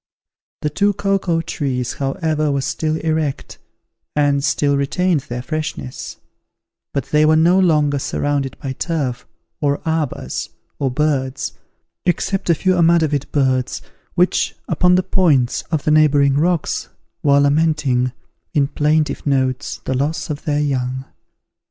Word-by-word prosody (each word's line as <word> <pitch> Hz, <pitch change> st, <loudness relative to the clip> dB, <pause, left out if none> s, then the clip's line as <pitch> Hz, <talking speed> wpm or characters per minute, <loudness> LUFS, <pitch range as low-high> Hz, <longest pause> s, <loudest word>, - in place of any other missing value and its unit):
The 150 Hz, -, 0 dB
two 205 Hz, +6 st, +2 dB
cocoa 195 Hz, -4 st, 0 dB
trees, 130 Hz, -6 st, -2 dB
however, 155 Hz, +1 st, -1 dB
were 140 Hz, -1 st, 0 dB
still 155 Hz, +3 st, -1 dB
erect, 155 Hz, -3 st, -2 dB, 0.6 s
and 145 Hz, -1 st, +2 dB
still 145 Hz, 0 st, +2 dB
retained 160 Hz, +5 st, +1 dB
their 120 Hz, 0 st, -4 dB
freshness; 140 Hz, -, -5 dB, 0.7 s
but 140 Hz, -, -3 dB
they 150 Hz, 0 st, +4 dB
were 155 Hz, +1 st, +5 dB
no 170 Hz, +4 st, +4 dB
longer 150 Hz, -6 st, +3 dB
surrounded 140 Hz, -1 st, -2 dB
by 135 Hz, -1 st, -5 dB
turf, 135 Hz, -5 st, -3 dB, 0.3 s
or 145 Hz, -1 st, +1 dB
arbours, 160 Hz, -4 st, -2 dB, 0.3 s
or 135 Hz, -, +1 dB
birds, 130 Hz, -1 st, -1 dB, 0.5 s
except 185 Hz, +1 st, -1 dB
a 170 Hz, -, +5 dB
few 185 Hz, +4 st, +1 dB
amadavid 160 Hz, -4 st, +2 dB
birds, 130 Hz, -3 st, 0 dB, 0.3 s
which, -, -, +2 dB
upon 180 Hz, 0 st, +3 dB
the 185 Hz, -, +2 dB
points 155 Hz, -10 st, +2 dB
of 155 Hz, -3 st, -1 dB
the 150 Hz, -, +1 dB
neighbouring 145 Hz, -2 st, +4 dB
rocks, 165 Hz, +3 st, 0 dB, 0.3 s
were 140 Hz, -1 st, +4 dB
lamenting, 145 Hz, -4 st, +2 dB, 0.4 s
in 140 Hz, -2 st, +3 dB
plaintive 150 Hz, 0 st, 0 dB
notes, 130 Hz, -4 st, 0 dB
the 130 Hz, -, -1 dB
loss 145 Hz, +5 st, -1 dB
of 145 Hz, -, -6 dB
their 150 Hz, -1 st, +1 dB
young. 130 Hz, -2 st, -1 dB
145 Hz, 135 wpm, -19 LUFS, 135-160 Hz, 0.7 s, were